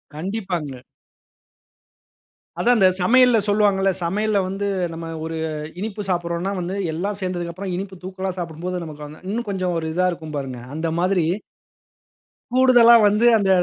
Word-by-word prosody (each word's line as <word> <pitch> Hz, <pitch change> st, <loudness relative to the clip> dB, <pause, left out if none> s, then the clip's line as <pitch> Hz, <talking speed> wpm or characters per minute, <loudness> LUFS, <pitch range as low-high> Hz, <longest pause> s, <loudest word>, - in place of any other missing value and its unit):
கண்டிப்பாங்க. 175 Hz, -, -4 dB, 1.8 s
அதுதான், 240 Hz, +7 st, +4 dB
இந்த 190 Hz, -2 st, +6 dB
சமையல்ல 250 Hz, +4 st, +5 dB
சொல்வாங்கல்ல. 200 Hz, -2 st, +3 dB
சமையல்ல 205 Hz, +5 st, 0 dB
வந்து, 195 Hz, +2 st, -3 dB, 0.3 s
நம்ம 165 Hz, 0 st, -6 dB, 0.2 s
ஒரு 165 Hz, 0 st, -4 dB, 0.4 s
இனிப்பு 210 Hz, +1 st, -4 dB
சாப்பிடுறோம்ன்னா, 175 Hz, +1 st, -1 dB
வந்து 180 Hz, +2 st, -3 dB, 0.2 s
எல்லாம் 195 Hz, +5 st, -3 dB
சேர்ந்ததுக்கப்புறம் 180 Hz, +1 st, -4 dB
இனிப்பு 190 Hz, +1 st, -5 dB
தூக்கலா 185 Hz, +1 st, -4 dB
சாப்பிடும்போது, 175 Hz, +2 st, -4 dB
நமக்கு 150 Hz, -1 st, -8 dB
வந்து 150 Hz, +1 st, -13 dB
இன்னும் 230 Hz, +2 st, -3 dB
கொஞ்சம் 185 Hz, -2 st, -1 dB
ஒரு 160 Hz, -, -4 dB
இதா 185 Hz, +2 st, +2 dB
இருக்கும், 160 Hz, -3 st, -7 dB
பாருங்க. 130 Hz, -3 st, -5 dB
அந்த 160 Hz, +1 st, -1 dB
மாதிரி 180 Hz, -1 st, +2 dB, 1.3 s
கூடுதலா 250 Hz, -2 st, +7 dB
வந்து, 210 Hz, +3 st, +2 dB
அந்த 200 Hz, -2 st, 0 dB
185 Hz, 130 wpm, -22 LUFS, 170-205 Hz, 1.8 s, கூடுதலா